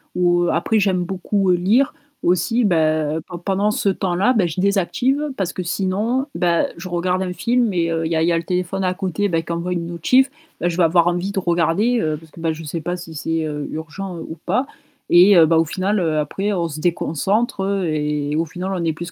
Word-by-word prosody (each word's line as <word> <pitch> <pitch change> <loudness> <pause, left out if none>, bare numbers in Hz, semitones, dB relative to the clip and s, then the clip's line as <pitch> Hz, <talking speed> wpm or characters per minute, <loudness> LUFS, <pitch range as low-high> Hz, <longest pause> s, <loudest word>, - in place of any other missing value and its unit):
ou 175 -1 +2
après 220 -1 +1
j'aime 185 -3 +1
beaucoup 190 +1 0
lire 205 +10 +2 0.3
aussi, 185 +8 +2
bah, 155 -3 +1 0.3
pendant 200 +1 +1
ce 205 -1 0
temps-là, 190 +5 +1
bah, 195 -7 +2
je 165 +3 -5
désactive 240 +10 +1
parce 185 -3 -2
que, - - -4
sinon, 205 +9 -1
bah, 170 -1 +2
je 185 +2 -7
regarde 180 +1 0
un 180 -1 -2
film 240 +2 +1
et 170 -2 0
heu, 165 0 -1
il - - -5
y 165 - +1
a 160 - +2
il - - +2
y 175 - +3
a 170 - +2
le 165 - -2
téléphone 180 +2 -2
à 185 0 0
côté, 190 +2 -1
bah, 165 -2 0
qui 170 - -7
envoie 170 +2 -2
une 170 -1 -3
notification, 255 - +2 0.3
bah, 175 - 0
je 170 - -3
vais 180 - +4
avoir 170 +1 +4
envie 175 +2 0
de 200 - -1
regarder, 175 +7 +1
heu, 155 -1 -1
parce 160 0 -17
que, - - -14
bah, 165 -1 0
je 160 +1 -9
sais 160 +2 -4
pas 175 +3 -3
si 170 -2 -9
c'est 160 +1 -2 0.2
urgent 170 +4 -6
ou 160 - -8
pas 255 - +1 0.5
et 185 +3 +7
bah, 160 +1 +3
au 165 - +3
final 195 +6 -1
après 160 +4 -1
on 170 -3 0
se 155 -1 -7
déconcentre 190 +6 0 0.2
et 150 -2 -1
au 165 +2 +1
final, 180 +4 -5
on 180 -2 -2
est 165 - +1
plus 170 +3 -7
175 Hz, 225 wpm, -20 LUFS, 165-195 Hz, 0.5 s, et